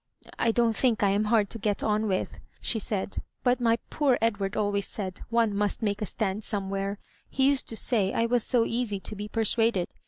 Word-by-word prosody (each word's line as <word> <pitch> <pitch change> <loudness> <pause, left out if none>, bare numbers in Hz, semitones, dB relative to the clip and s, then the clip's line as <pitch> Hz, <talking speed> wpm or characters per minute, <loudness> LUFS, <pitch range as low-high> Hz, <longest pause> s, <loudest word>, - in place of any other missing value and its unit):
" - - -17
I 230 - +3
don't 230 -1 +2
think 230 -2 +2
I 200 - +4
am 205 +2 +1
hard 215 -1 +3
to 230 - -5
get 205 -1 -1
on 215 0 +1
with," 190 -2 -2 0.2
^e 225 - +1
said, 200 -1 -3
" - - -49
but 250 0 +2
my 230 -1 +3
poor 275 -5 +2
Edward 205 -3 -1
always 205 -1 0
said 190 -3 -5
one 230 -2 +2
must 205 +2 0
make 205 -1 -1
a 210 - -1
stand 210 0 -2
somewhere. 195 0 -2 0.3
He 265 0 +2
used 280 -1 +2
to 225 - -2
say 210 -6 +2
I 230 - +1
was 240 -1 +2
so 235 -2 +2
easy 230 -4 -1
to 210 - -6
be 205 +1 -5
persuaded. 225 -3 +1
215 Hz, 220 wpm, -27 LUFS, 200-230 Hz, 0.3 s, I